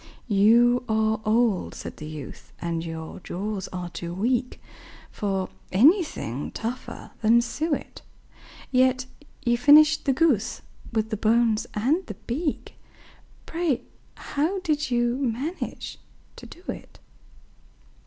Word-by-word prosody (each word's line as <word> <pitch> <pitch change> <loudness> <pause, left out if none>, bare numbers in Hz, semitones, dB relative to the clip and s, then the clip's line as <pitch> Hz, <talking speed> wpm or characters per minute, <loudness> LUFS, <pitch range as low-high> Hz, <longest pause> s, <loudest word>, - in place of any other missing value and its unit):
"You 235 +4 +5
are 220 0 +1
old," 220 -3 +2
said - - -8
the 150 - -7
youth, 155 -4 -9
"and 170 -1 -2
your 160 0 -6
jaws 195 +2 -4
are 180 -2 -5
too 170 0 -6
weak 245 +5 0 0.5
For 195 -2 -1 0.2
anything 255 - +3
tougher 235 +3 -6
than 230 +2 +5
suet; 300 +6 -3 0.7
Yet 255 0 +3 0.4
you 240 0 +2
finished 300 +3 +6
the 275 - +3
goose, 260 - +1 0.3
with 220 -1 -1
the 215 - -1
bones 225 0 +2
and 275 - +1
the - - -6
beak 290 +5 -3 0.7
Pray, 330 -6 -1 0.3
how 315 +7 -1
did 305 -4 0
you 240 0 +1
manage 275 +6 -3 0.4
to - - -11
do 350 - -14
it?" - - -7
235 Hz, 120 wpm, -25 LUFS, 205-280 Hz, 0.7 s, finished